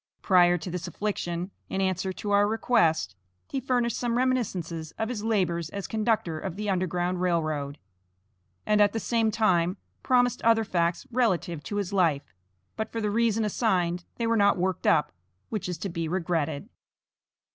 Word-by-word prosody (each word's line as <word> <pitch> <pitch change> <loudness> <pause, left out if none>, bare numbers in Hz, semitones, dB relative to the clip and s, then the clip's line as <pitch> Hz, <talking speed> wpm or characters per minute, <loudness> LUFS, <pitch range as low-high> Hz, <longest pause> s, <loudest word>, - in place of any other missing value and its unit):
Prior 175 -2 +5
to 175 +2 -6
this 175 -1 -4
affliction, 180 -3 -3 0.2
in 190 - -2
answer 190 0 0
to 205 +2 -5
our 205 0 +4
request, 165 - +2 0.3
he 270 - -2
furnished 245 -3 0
some 240 -1 -1
reminiscences 185 -11 -1
of 220 0 -2
his 220 -4 -4
labors 175 -7 0
as 200 -1 -5
conductor 215 -7 0
of 180 0 -5
the 210 0 -2
Underground 180 -1 -1
Rail 170 -3 +2
Road, 145 -2 -3 0.9
and 210 0 +3
at 205 - +4
the 225 - -1
same 225 -1 +1
time, 185 -4 +2 0.2
promised 245 -1 +2
other 225 -1 +4
facts 170 -4 0
relative 185 -9 0
to 205 - -4
his 200 -1 -2
life, 155 - +1 0.4
but 220 - -4
for 230 - -3
the 210 -2 -1
reason 225 0 +2
assigned, 180 -5 0
they 235 - -2
were 230 0 +2
not 200 -2 +4
worked 185 +1 -1
up, 150 -2 +3 0.4
which 215 -4 -3
is 180 - -3
to 185 - -4
be 165 -2 -3
regretted. 165 -1 -1
190 Hz, 170 wpm, -27 LUFS, 170-220 Hz, 0.9 s, Prior